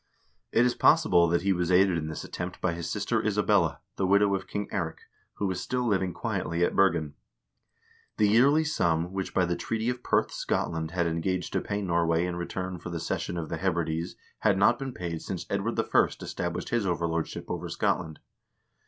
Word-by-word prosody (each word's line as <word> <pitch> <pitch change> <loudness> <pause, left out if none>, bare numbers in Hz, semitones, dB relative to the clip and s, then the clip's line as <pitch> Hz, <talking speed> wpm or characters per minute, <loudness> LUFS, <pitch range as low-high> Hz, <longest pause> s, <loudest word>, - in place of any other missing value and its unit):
It 120 - +4
is 125 - +2
possible 90 - +4
that 85 +1 +1
he 100 0 +3
was 90 -1 -1
aided 95 0 +5
in 80 -2 -2
this 80 - -5
attempt 90 +1 -6
by 85 - 0
his 85 0 -5
sister - - -1
Isabella, - - +2 0.2
the 95 - +1
widow 100 +1 +4
of 95 -1 -2
King 105 -1 -3
Eirik, 85 -5 -3 0.3
who 100 - -2
was 95 -1 -1
still 125 +4 -1
living 95 -5 +1
quietly 85 0 -2
at - - -2
Bergen. 85 -7 +2 1.0
The 105 - +4
yearly 135 +9 +5
sum 85 - 0
which, 95 -1 -3
by 90 - +2
the 85 0 -1
treaty 115 +5 -2
of 125 0 -3
Perth, - - +1
Scotland 80 -1 -2
had 85 0 0
engaged 85 +2 -1
to - - +1
pay 100 0 -3
Norway 85 -1 +1
in 90 -1 -3
return 90 +1 -4
for 85 - -7
the 85 -1 -4
cession 85 +1 -3
of 80 -2 -4
the 85 - -3
Hebrides 85 -2 -1 0.2
had 100 -3 +3
not 100 +5 +4
been 135 -1 -4
paid 85 -7 -5
since 90 -3 -5
Edward 100 +4 -1
I. - - +3 0.4
established - - -4
his 115 -4 0
overlordship 85 -2 -2
over - - -4
Scotland. 80 -1 -1
90 Hz, 195 wpm, -28 LUFS, 85-100 Hz, 1.0 s, aided